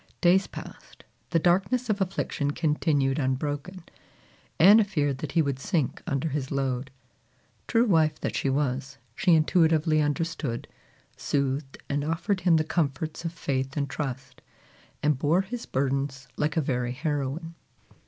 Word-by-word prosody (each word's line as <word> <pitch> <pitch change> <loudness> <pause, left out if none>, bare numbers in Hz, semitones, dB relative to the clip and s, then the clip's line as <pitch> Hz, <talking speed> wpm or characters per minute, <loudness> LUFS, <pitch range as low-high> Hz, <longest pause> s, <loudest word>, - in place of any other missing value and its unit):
Days 185 +2 +4
passed, - - -11 0.3
the 170 - +2
darkness 190 +10 +2
of 210 -2 0
affliction 180 -5 -1
continued 150 -3 +1
unbroken. 145 +6 -2 0.8
Anna 205 +6 +8
feared 145 -9 -1
that 150 - -5
he 165 - +4
would 140 -2 -2
sink 150 -2 -1
under 140 +3 -1
his 140 -2 -3
load. 135 -1 -1 0.8
True 230 0 +3
wife 160 -7 +3
that - - -2
she 135 - 0
was, 135 0 -1 0.2
she 175 +7 +4
intuitively 160 -1 +3
understood, 145 -5 -2 0.5
soothed, 135 0 -1
and 145 0 -1
offered 175 +5 -1
him 175 -1 +4
the 155 - +2
comforts 155 0 -2
of 165 - -1
faith 135 -4 -3
and 140 -1 0
trust, 135 -1 -5 0.6
and 150 -3 +2
bore 160 +7 +3
his 230 +5 -6
burdens 135 0 -1
like 150 +2 -1
a - - +4
very 125 -3 -1
heroine. 150 +3 -3
150 Hz, 145 wpm, -27 LUFS, 135-170 Hz, 0.8 s, Anna